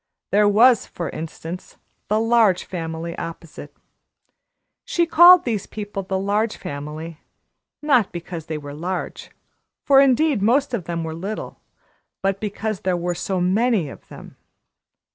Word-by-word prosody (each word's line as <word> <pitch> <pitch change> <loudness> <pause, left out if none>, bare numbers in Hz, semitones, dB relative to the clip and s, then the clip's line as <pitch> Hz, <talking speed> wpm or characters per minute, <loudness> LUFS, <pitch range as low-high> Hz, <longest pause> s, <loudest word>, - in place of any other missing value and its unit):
There 205 0 +4
was, 230 +3 +5
for 170 - -5
instance, 165 +2 -8 0.3
the 215 +1 +1
Large 225 -5 +3
Family 165 -1 -5
opposite. 165 -3 -8 1.1
She 345 - +1
called 345 +2 +7
these 220 -5 -2
people 205 -2 -5
the 190 0 -3
Large 205 +3 0
Family 155 0 -7 0.6
not 255 -9 +3
because 170 -2 -7
they 155 - -3
were 145 -1 -8
large, 175 +4 -5 0.6
for 275 -1 +6
indeed 275 -2 +3
most 255 +6 +2
of 200 -8 -2
them 170 -1 -3
were 160 0 -4
little, 195 +6 -6 0.6
but 195 0 0
because 215 0 -3
there 185 -1 -1
were 175 0 -2
so 185 +2 -3
many 190 - +1
of - - -13
them. - - -13
195 Hz, 140 wpm, -22 LUFS, 170-225 Hz, 1.1 s, called